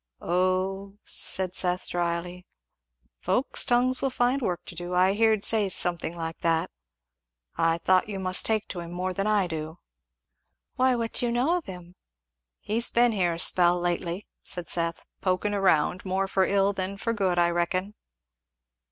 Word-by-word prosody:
"O," 185 +3 -1
said 185 -1 +2
Seth 180 -1 +1
dryly, 175 +1 -3 0.7
"folks' 220 +9 0
tongues 250 +1 +2
will 270 - +1
find 255 +2 0
work 180 -6 -3
to - - -8
do; 175 +1 -5
I 185 +2 +4
heerd 220 -1 +2
say 215 -3 +4
something 175 -2 -1
like 165 0 -5
that 165 -1 0 0.8
I 165 0 +1
thought 185 +4 +2
you 200 - -4
must 185 -1 +1
take 220 -1 0
to 180 - -5
him 170 0 -7
more 185 +1 -3
than 195 +2 -2
I 210 -3 +2
do." 160 -1 -6 1.0
"Why 255 0 +3
what 230 -1 -3
do 245 - +1
you - - -1
know 255 +9 +1
of 355 - -3
him?" 180 -1 -10 0.7
"He's 230 +3 0
been 240 0 +3
here 180 -5 0
a - - -8
spell 175 0 +4
lately," 175 +2 -2 0.2
said 175 -2 -6
Seth, 170 -1 -1 0.2
"poking 185 +2 0
round; 185 -3 +1
more 190 +1 -1
for 190 0 +1
ill 200 0 +2
than 195 +1 -4
for 230 +3 -2
good, 190 -5 0
I 175 0 +3
reckon." 185 +4 -1
185 Hz, 170 wpm, -26 LUFS, 175-210 Hz, 1.0 s, I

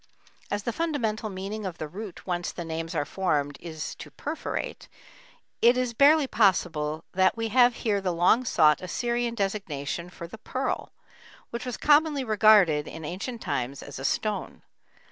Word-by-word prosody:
As 205 0 -2
the 235 - -2
fundamental 230 -10 -1
meaning 200 +3 -5
of 185 -4 -5
the 155 - -4
root 195 +4 -8
whence 175 -1 -2
the 175 - -6
names 165 +1 -4
are 145 -2 0
formed 145 -4 -1
is 160 -2 -6
"to - - -8
perforate," 305 +3 -5 0.7
it 240 +2 +6
is 250 -2 0
barely 290 +4 +6
possible 165 - +1
that 185 +3 +2
we 225 0 -1
have 245 +1 +5
here 205 -3 0
the 185 -2 0
long 175 +8 +3
sought 155 -10 +4
Assyrian 235 +5 -1
designation 180 -6 -3
for 170 - -9
the 195 +6 -11
pearl, 260 +4 -3 0.6
which 235 +2 -5
was 245 - -3
commonly 295 -1 +4
regarded 210 -9 +5
in 160 -1 -8
ancient 200 - -5
times 130 +2 -3
as 140 -2 -8
a - - -6
stone. 210 +9 -2
200 Hz, 165 wpm, -27 LUFS, 165-235 Hz, 0.7 s, it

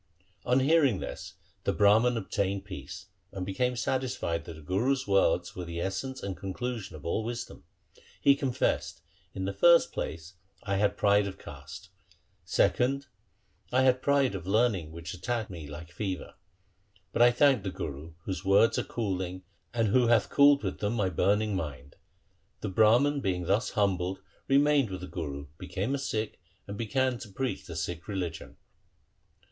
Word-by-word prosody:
1 125 +1 +2
On - - +1
hearing 140 - +4
this - - -7 0.3
the - - +1
Brahman 110 +4 +4
obtained 100 -2 -2
peace, 90 -9 -8 0.3
and 95 -1 -4
became 125 +6 0
satisfied 120 -10 -2
that 85 - -7
the 80 - -12
Guru's 125 - 0
words 95 -3 +2
were 90 - -5
the 85 0 -5
essence 95 +9 -3
and 100 -1 -3
conclusion 100 -1 -5
of 75 - -11
all 95 +6 0
wisdom. 120 +2 -6 0.5
He 140 - +6
confessed, 135 -3 -1
' - - -36
In 95 - -3
the 100 - -2
first 170 +12 +5
place, 85 +3 -5 0.3
I 100 -3 -1
had 100 0 +1
pride 100 0 +3
of 95 0 -7
caste; 75 +5 -10 0.5
secondly, 125 +9 +1 0.7
I 130 +1 +3
had 130 -1 +3
pride 140 -4 +2
of 90 -2 -6
learning 100 -6 +1
which 85 0 -7
attacked 110 +3 -3
me 80 -5 -8
like 75 +3 -9
fever; 95 -1 -4 0.8
but - - +1
I 120 - +8
thank 130 -1 +4
the 95 - -3
Guru, 75 -2 -6
whose 95 -1 -4
words 100 +4 +4
are - - 0
cooling, 95 -4 -3 0.3
and 115 -3 +1
who 125 +3 +4
hath 115 -2 +3
cooled 140 0 +6
with - - -3
them 105 +1 -1
my 105 -5 +1
burning 105 +1 +1
mind.' 70 -6 -5 0.7
The - - -2
Brahman 120 +9 +4
being 90 -5 -1
thus 100 +7 +1
humbled 95 -2 +1 0.3
remained 140 -2 +4
with 95 -2 -6
the 90 - -6
Guru, 70 -5 -5
became 105 +7 -3
a 140 - -1
Sikh, 110 -5 -3 0.3
and 100 - -6
began 120 +3 0
to 110 - -9
preach 130 +6 -3
the 85 - -7
Sikh 85 +2 -4
religion. 95 -5 -5
100 Hz, 170 wpm, -29 LUFS, 90-125 Hz, 0.8 s, I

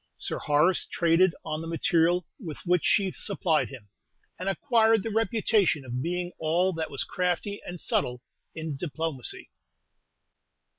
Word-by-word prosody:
Sir - - -4
Horace 150 +5 +3
traded 170 +1 +3
on 155 -1 -3
the 165 - -6
material 165 +1 +2
with 165 - -7
which 180 -1 +2
she 195 -2 +3
supplied 180 -6 0
him, 125 -7 -11 0.5
and 185 +2 -1
acquired 225 0 +3
the 225 - -3
reputation 220 - +2
of 125 0 -3
being 175 +3 -2
all 175 +4 +2
that 160 -1 -3
was 140 - -2
crafty 180 +3 -2
and 175 0 -6
subtle 125 -4 -1 0.3
in 160 -2 -4
diplomacy. 150 -2 -4
170 Hz, 140 wpm, -27 LUFS, 155-190 Hz, 0.5 s, Horace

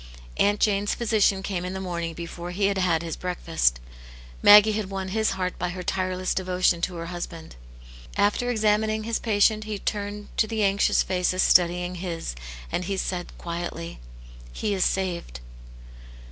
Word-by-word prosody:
Aunt 205 +1 +3
Jane's 205 -1 +1
physician 210 -4 +2
came 185 -3 -3
in 180 +1 -4
the 190 - -4
morning 170 -3 -4
before 170 +1 -7
he 195 +3 0
had 195 -1 +1
had 170 -3 +1
his 165 -1 -4
breakfast. 165 - 0 0.6
Maggie 210 +1 +9
had 210 -2 -2
won 190 -1 -4
his 220 +2 +1
heart 185 -1 -3
by 180 - -1
her 180 +1 -6
tireless 185 0 -1
devotion 180 -2 +1
to 180 0 -2
her 165 0 -5
husband. 170 - -7 0.6
After 205 +4 +2
examin 215 -1 +2
ing 215 0 -2
his 230 0 -1
patient 215 0 +2
he 215 -1 -3
turned 205 0 -4
to 220 - +3
the 220 -1 -1
anxious 200 0 +3
faces 185 0 +1
study 175 0 +4
ing 180 +1 -4
his, 170 - -4 0.4
and 180 - -1 0.2
said, 180 -2 -3
quietly, 170 -1 -5 0.3
" - - -17
He 210 - 0
is 190 -2 +1
saved." 175 - -2
185 Hz, 170 wpm, -25 LUFS, 175-205 Hz, 0.6 s, Maggie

